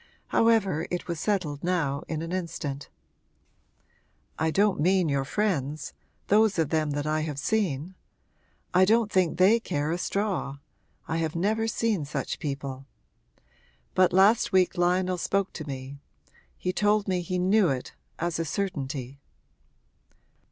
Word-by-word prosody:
However, 205 Hz, -8 st, +2 dB
it 180 Hz, -, -3 dB
was 170 Hz, -3 st, -3 dB
settled 160 Hz, -7 st, -1 dB
now 160 Hz, -6 st, 0 dB
in 160 Hz, 0 st, -3 dB
an 165 Hz, -, -5 dB
instant. 150 Hz, -6 st, -4 dB, 1.5 s
'I 160 Hz, 0 st, +2 dB
don't 200 Hz, +2 st, +2 dB
mean 180 Hz, +1 st, +3 dB
your 140 Hz, -1 st, 0 dB
friends 155 Hz, -6 st, -1 dB, 0.3 s
those 215 Hz, -1 st, +3 dB
of 160 Hz, -3 st, +1 dB
them 155 Hz, -1 st, +1 dB
that 145 Hz, -, -2 dB
I 155 Hz, +1 st, +1 dB
have 155 Hz, -3 st, -4 dB
seen. 175 Hz, -2 st, -1 dB, 0.8 s
I 185 Hz, +1 st, +6 dB
don't 220 Hz, +2 st, +3 dB
think 180 Hz, -4 st, +2 dB
they 195 Hz, +6 st, +5 dB
care 150 Hz, -8 st, -2 dB
a 175 Hz, -, -1 dB
straw 195 Hz, -9 st, -2 dB, 0.5 s
I 160 Hz, -, -1 dB
have 160 Hz, -1 st, -2 dB
never 215 Hz, +6 st, +1 dB
seen 225 Hz, -6 st, 0 dB
such 140 Hz, -2 st, -4 dB
people. 135 Hz, -3 st, -5 dB, 1.1 s
But 185 Hz, -1 st, +4 dB
last 195 Hz, +5 st, +4 dB
week 185 Hz, 0 st, +3 dB
Lionel 180 Hz, +1 st, +1 dB
spoke 195 Hz, +2 st, 0 dB
to 155 Hz, -2 st, -7 dB
me 135 Hz, 0 st, -7 dB, 0.6 s
he 180 Hz, -, -2 dB
told 210 Hz, +1 st, +2 dB
me 185 Hz, -2 st, 0 dB
he 180 Hz, +1 st, -3 dB
knew 190 Hz, +1 st, +3 dB
it, 130 Hz, -2 st, -3 dB, 0.2 s
as 170 Hz, 0 st, -2 dB
a -, -, +1 dB
certainty.' 140 Hz, -7 st, -4 dB
175 Hz, 145 wpm, -27 LUFS, 150-195 Hz, 1.5 s, I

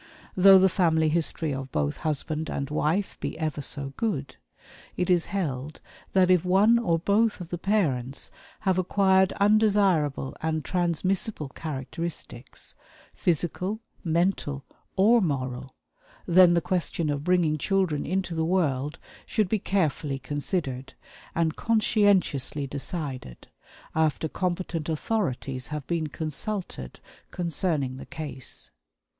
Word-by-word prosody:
Though 195 Hz, 0 st, +8 dB
the 190 Hz, 0 st, +6 dB
family 165 Hz, -4 st, +2 dB
history 160 Hz, -1 st, 0 dB
of 135 Hz, -1 st, -5 dB
both 75 Hz, -1 st, -1 dB
husband 155 Hz, +1 st, -2 dB
and 140 Hz, +1 st, -3 dB
wife 165 Hz, +6 st, 0 dB
be -, -, -4 dB
ever 155 Hz, -2 st, -2 dB
so 140 Hz, -1 st, -4 dB
good, 200 Hz, -, -2 dB, 0.6 s
it 180 Hz, 0 st, +1 dB
is 175 Hz, -1 st, +3 dB
held 155 Hz, -7 st, -3 dB, 0.3 s
that 185 Hz, -1 st, +5 dB
if 180 Hz, -3 st, +4 dB
one 200 Hz, +6 st, +5 dB
or 170 Hz, -8 st, +1 dB
both 205 Hz, +6 st, +2 dB
of 175 Hz, -2 st, -7 dB
the 175 Hz, -, -4 dB
parents 140 Hz, -, 0 dB, 0.3 s
have 190 Hz, -2 st, +2 dB
acquired 190 Hz, 0 st, +3 dB
undesirable 200 Hz, -10 st, +2 dB
and 160 Hz, -1 st, -1 dB
transmissible 180 Hz, -1 st, -1 dB
characteristics, 140 Hz, -2 st, -6 dB, 0.4 s
physical, 180 Hz, +5 st, 0 dB, 0.2 s
mental, 165 Hz, -5 st, 0 dB, 0.3 s
or 225 Hz, +5 st, +5 dB
moral, 130 Hz, -5 st, -2 dB, 0.5 s
then 175 Hz, 0 st, +6 dB
the 170 Hz, -, +3 dB
question 170 Hz, -3 st, -1 dB
of 145 Hz, 0 st, -3 dB
bringing 170 Hz, -3 st, +2 dB
children 185 Hz, -4 st, +1 dB
into 185 Hz, 0 st, -1 dB
the 160 Hz, -1 st, 0 dB
world 150 Hz, -5 st, 0 dB, 0.3 s
should 215 Hz, -5 st, +1 dB
be 220 Hz, -, +1 dB
carefully 155 Hz, -8 st, 0 dB
considered, 135 Hz, -1 st, -3 dB, 0.4 s
and 165 Hz, -1 st, +1 dB
conscientiously 205 Hz, -, +2 dB
decided, 135 Hz, -, -5 dB, 0.4 s
after 160 Hz, 0 st, +1 dB
competent 175 Hz, -2 st, -2 dB
authorities 140 Hz, -, -2 dB
have 150 Hz, -2 st, -5 dB
been 165 Hz, -2 st, -1 dB
consulted 155 Hz, -, -4 dB, 0.3 s
concerning 165 Hz, -6 st, -1 dB
the -, -, -9 dB
case. 150 Hz, -5 st, -6 dB
165 Hz, 120 wpm, -26 LUFS, 145-190 Hz, 0.6 s, Though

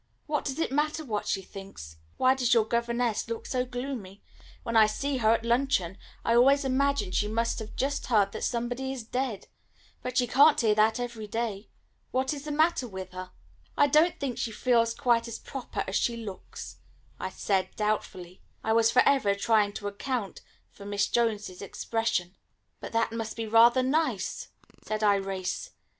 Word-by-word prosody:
What 300 Hz, -1 st, -1 dB
does 270 Hz, -2 st, -3 dB
it 325 Hz, -, -1 dB
matter 300 Hz, +2 st, 0 dB
what 210 Hz, -5 st, -3 dB
she 195 Hz, -, -1 dB
thinks? 185 Hz, -, -10 dB, 0.2 s
Why 255 Hz, 0 st, +5 dB
does 250 Hz, -2 st, +2 dB
your 225 Hz, -2 st, +4 dB
governess 235 Hz, 0 st, 0 dB
look 230 Hz, -, -4 dB
so 255 Hz, -1 st, 0 dB
gloomy? 245 Hz, -6 st, -6 dB, 0.4 s
When 230 Hz, -, -3 dB
I 220 Hz, -1 st, +7 dB
see 275 Hz, +6 st, -2 dB
her 220 Hz, -3 st, +3 dB
at 230 Hz, -, -5 dB
luncheon 235 Hz, -7 st, +1 dB, 0.3 s
I 230 Hz, -, +3 dB
always 275 Hz, +4 st, +5 dB
imagine 265 Hz, -6 st, +1 dB
she 210 Hz, -, +1 dB
must 230 Hz, +3 st, -1 dB
have 220 Hz, -1 st, -8 dB
just 280 Hz, +1 st, -1 dB
heard 205 Hz, -5 st, +3 dB
that -, -, -6 dB
somebody 245 Hz, +2 st, -2 dB
is 260 Hz, -3 st, -5 dB
dead. 250 Hz, -2 st, -3 dB, 0.5 s
But 250 Hz, 0 st, -4 dB
she 250 Hz, -, +4 dB
can't 280 Hz, +6 st, +5 dB
hear 220 Hz, -3 st, +3 dB
that 220 Hz, +2 st, +3 dB
every 235 Hz, -3 st, -5 dB
day. 220 Hz, -2 st, -3 dB, 0.4 s
What 265 Hz, +2 st, 0 dB
is 285 Hz, 0 st, -7 dB
the 300 Hz, -, -4 dB
matter 310 Hz, -3 st, +2 dB
with 190 Hz, -3 st, -7 dB
her?" 185 Hz, 0 st, -7 dB, 0.5 s
"I 290 Hz, -, +6 dB
don't 305 Hz, +4 st, +3 dB
think 270 Hz, -4 st, -3 dB
she 230 Hz, -, -2 dB
feels 230 Hz, 0 st, +2 dB
quite 240 Hz, -4 st, +2 dB
as 230 Hz, -, -5 dB
proper 270 Hz, -3 st, -5 dB
as 190 Hz, -, 0 dB
she 235 Hz, -1 st, 0 dB
looks," 210 Hz, -5 st, -8 dB, 0.4 s
I -, -, -3 dB
said 190 Hz, -2 st, 0 dB
doubtfully; 190 Hz, -4 st, -3 dB, 0.2 s
I 220 Hz, -, +1 dB
was 225 Hz, 0 st, +4 dB
for 250 Hz, +2 st, +5 dB
ever 240 Hz, -8 st, +3 dB
trying 210 Hz, 0 st, +2 dB
to 205 Hz, -, -5 dB
account 205 Hz, 0 st, -4 dB, 0.3 s
for 200 Hz, -, -13 dB
Miss 205 Hz, 0 st, 0 dB
Jones's 210 Hz, -6 st, -1 dB
expression. 200 Hz, -2 st, -2 dB, 0.4 s
"But -, -, -7 dB
that 230 Hz, 0 st, +1 dB
must 225 Hz, -1 st, -5 dB
be 225 Hz, -, -2 dB
rather 235 Hz, +3 st, +5 dB
nice," 305 Hz, +5 st, -1 dB, 0.4 s
said 215 Hz, 0 st, -3 dB
Irais. 195 Hz, -2 st, 0 dB
230 Hz, 180 wpm, -28 LUFS, 210-260 Hz, 0.5 s, I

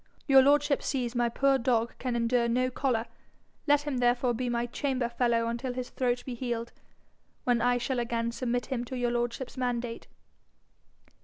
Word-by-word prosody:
Your 270 Hz, -3 st, +7 dB
lordship 285 Hz, +1 st, +3 dB
sees 250 Hz, -4 st, -2 dB
my 240 Hz, -1 st, +1 dB
poor 275 Hz, +3 st, +2 dB
dog 235 Hz, -1 st, +1 dB
can 250 Hz, -2 st, -2 dB
endure 235 Hz, 0 st, +2 dB
no 255 Hz, +2 st, +1 dB
collar: 245 Hz, -3 st, 0 dB, 0.6 s
let 290 Hz, 0 st, +4 dB
him 290 Hz, -3 st, -2 dB
therefore 245 Hz, 0 st, +2 dB
be 245 Hz, +2 st, -2 dB
my 240 Hz, 0 st, 0 dB
chamber 255 Hz, 0 st, -1 dB
fellow 235 Hz, -1 st, +1 dB
until 240 Hz, +2 st, -3 dB
his 250 Hz, 0 st, -5 dB
throat 245 Hz, -1 st, -1 dB
be 255 Hz, -, -4 dB
healed, 235 Hz, -1 st, -3 dB, 0.7 s
when 245 Hz, -2 st, +2 dB
I 245 Hz, +1 st, +3 dB
shall 250 Hz, +1 st, -1 dB
again 235 Hz, -1 st, -1 dB
submit 245 Hz, 0 st, -2 dB
him 250 Hz, -3 st, -3 dB
to 255 Hz, +2 st, -5 dB
your 245 Hz, -1 st, 0 dB
lordship's 240 Hz, +2 st, -3 dB
mandate.' 240 Hz, -2 st, -3 dB
245 Hz, 170 wpm, -29 LUFS, 235-260 Hz, 0.7 s, Your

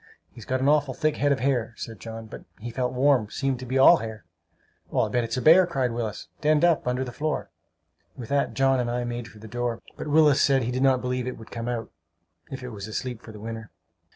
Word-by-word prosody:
"He's 115 Hz, -, -12 dB
got 130 Hz, 0 st, -1 dB
an 135 Hz, -, +2 dB
awful 145 Hz, -3 st, +3 dB
thick 155 Hz, -1 st, 0 dB
head 145 Hz, 0 st, +2 dB
of 140 Hz, -, +1 dB
hair," 120 Hz, -4 st, 0 dB
said 115 Hz, -3 st, -7 dB
John; 115 Hz, +1 st, -7 dB
"but 110 Hz, -, -10 dB
he 120 Hz, +2 st, -6 dB
felt 125 Hz, +1 st, -1 dB
warm! 130 Hz, -4 st, +3 dB
Seemed 135 Hz, -1 st, -1 dB
to 130 Hz, -, -7 dB
be 130 Hz, +2 st, 0 dB
all 150 Hz, +6 st, +8 dB
hair!" 110 Hz, -, -7 dB, 0.7 s
"I'll -, -, +1 dB
bet 120 Hz, -1 st, +1 dB
it's 115 Hz, +1 st, -3 dB
a 125 Hz, -, -2 dB
bear!" 175 Hz, +3 st, +7 dB
cried 130 Hz, -7 st, 0 dB
Willis. 115 Hz, -2 st, -4 dB
"Denned 155 Hz, +1 st, +4 dB
up, 165 Hz, -7 st, +2 dB
under 125 Hz, +1 st, 0 dB
the 125 Hz, -, -6 dB
floor!" 155 Hz, +5 st, -3 dB, 0.7 s
With 120 Hz, -3 st, -8 dB
that 140 Hz, 0 st, 0 dB
John 135 Hz, -1 st, +3 dB
and 120 Hz, -1 st, -1 dB
I 120 Hz, +1 st, -1 dB
made 120 Hz, -1 st, -4 dB
for 110 Hz, -, -15 dB
the 110 Hz, +1 st, -11 dB
door; 120 Hz, +1 st, -2 dB, 0.2 s
but -, -, -5 dB
Willis 150 Hz, -2 st, +5 dB
said 135 Hz, -2 st, +3 dB
he 120 Hz, -, -2 dB
did 130 Hz, +1 st, -2 dB
not 135 Hz, -2 st, +4 dB
believe 125 Hz, 0 st, -2 dB
it 130 Hz, -, -4 dB
would 110 Hz, -, -13 dB
come 115 Hz, 0 st, -5 dB
out, 120 Hz, -2 st, -3 dB, 0.6 s
if 130 Hz, -1 st, -7 dB
it 125 Hz, -, -5 dB
was 105 Hz, -3 st, -7 dB
asleep 120 Hz, +2 st, -4 dB
for 110 Hz, -, -11 dB
the 105 Hz, -, -11 dB
winter. 110 Hz, 0 st, -7 dB
125 Hz, 245 wpm, -26 LUFS, 115-135 Hz, 0.7 s, all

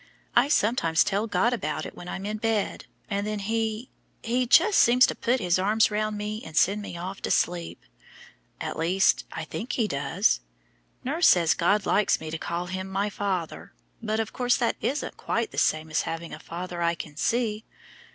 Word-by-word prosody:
I -, -, +5 dB
sometimes 225 Hz, -, +2 dB
tell 210 Hz, +2 st, -1 dB
God 235 Hz, +3 st, +2 dB
about 155 Hz, -8 st, -3 dB
it -, -, -7 dB
when 175 Hz, -, -10 dB
I'm 190 Hz, -, -5 dB
in 210 Hz, +1 st, -3 dB
bed, 220 Hz, -2 st, -1 dB, 0.2 s
and 200 Hz, +1 st, -2 dB
then 215 Hz, 0 st, -2 dB
He 220 Hz, +3 st, -2 dB, 0.3 s
He 245 Hz, +2 st, 0 dB
just 370 Hz, -, +5 dB
seems 250 Hz, +2 st, +6 dB
to -, -, -1 dB
put 250 Hz, +2 st, 0 dB
His 180 Hz, -3 st, +1 dB
arms 215 Hz, +3 st, +3 dB
round 215 Hz, 0 st, -1 dB
me 210 Hz, +1 st, -4 dB
and 160 Hz, -1 st, -8 dB
send 200 Hz, +5 st, +3 dB
me 190 Hz, -4 st, -7 dB
off 185 Hz, +3 st, -6 dB
to -, -, -3 dB
sleep; 170 Hz, -1 st, -1 dB, 0.8 s
at -, -, -4 dB
least, 180 Hz, +4 st, +2 dB
I 160 Hz, -, -5 dB
think 225 Hz, +9 st, -5 dB
He 225 Hz, -4 st, +1 dB
does. 145 Hz, +6 st, +1 dB, 0.6 s
Nurse 315 Hz, +7 st, +2 dB
says 170 Hz, -3 st, +5 dB
God 200 Hz, +4 st, +1 dB
likes 210 Hz, -, +2 dB
me 155 Hz, 0 st, -7 dB
to 160 Hz, -, -4 dB
call 170 Hz, +1 st, -3 dB
Him 185 Hz, +1 st, -5 dB
my 200 Hz, +2 st, -1 dB
Father, 190 Hz, -5 st, -3 dB, 0.3 s
but 220 Hz, -1 st, -1 dB
of 220 Hz, -1 st, -3 dB
course 245 Hz, -1 st, +2 dB
that 240 Hz, -3 st, 0 dB
isn't 280 Hz, -, -2 dB
quite -, -, -2 dB
the -, -, -2 dB
same 155 Hz, 0 st, +1 dB
as -, -, +2 dB
having 165 Hz, 0 st, -5 dB
a -, -, -7 dB
father 175 Hz, +1 st, -6 dB
I 170 Hz, 0 st, +2 dB
can 155 Hz, -2 st, -8 dB
see. 220 Hz, +4 st, 0 dB
205 Hz, 195 wpm, -26 LUFS, 170-225 Hz, 0.8 s, seems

